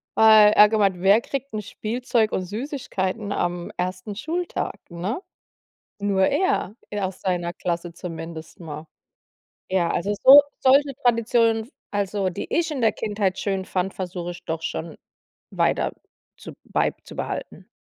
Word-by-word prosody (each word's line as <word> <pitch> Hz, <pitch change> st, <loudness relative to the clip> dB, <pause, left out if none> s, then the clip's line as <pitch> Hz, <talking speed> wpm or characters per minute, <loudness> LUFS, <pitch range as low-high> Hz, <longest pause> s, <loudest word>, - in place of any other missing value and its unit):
Weil 215 Hz, -1 st, +8 dB
er 210 Hz, 0 st, +8 dB
gemeint: 200 Hz, -4 st, +2 dB
„Wer 200 Hz, +4 st, +5 dB
kriegt 275 Hz, -1 st, -5 dB
'n 215 Hz, -, -2 dB
Spielzeug 225 Hz, +1 st, -1 dB
und -, -, 0 dB
Süßigkeiten 210 Hz, -2 st, -3 dB
am 175 Hz, -2 st, -2 dB
ersten 185 Hz, +3 st, -3 dB
Schultag“, 330 Hz, -, -3 dB
ne? 185 Hz, -, -4 dB, 0.8 s
Nur 195 Hz, -1 st, +2 dB
er. 375 Hz, -, 0 dB, 0.2 s
Er 205 Hz, -2 st, -1 dB
aus 185 Hz, 0 st, -10 dB
seiner 175 Hz, -2 st, -1 dB
Klasse 170 Hz, -1 st, -3 dB
zumindest 165 Hz, -2 st, -8 dB
mal. 155 Hz, -2 st, -8 dB, 0.8 s
Ja, 185 Hz, -2 st, +1 dB
also 205 Hz, +4 st, -1 dB
so 280 Hz, +2 st, +11 dB, 0.2 s
solche 275 Hz, +2 st, +4 dB
Traditionen 230 Hz, -1 st, +3 dB
f -, -, -20 dB, 0.2 s
also, 200 Hz, -1 st, -1 dB
die 175 Hz, -, -6 dB
ich 335 Hz, -1 st, +1 dB
in 275 Hz, -5 st, -3 dB
der 225 Hz, -, +4 dB
Kindheit 205 Hz, -3 st, -1 dB
schön 195 Hz, -2 st, -1 dB
fand, 185 Hz, +1 st, -2 dB
versuche 180 Hz, -2 st, -5 dB
ich 175 Hz, -, -11 dB
doch 160 Hz, 0 st, -3 dB
schon 160 Hz, -1 st, -4 dB, 0.5 s
weiter -, -, +1 dB, 0.4 s
zu -, -, -10 dB
beizubehalten. -, -, -3 dB
200 Hz, 140 wpm, -23 LUFS, 180-225 Hz, 0.8 s, so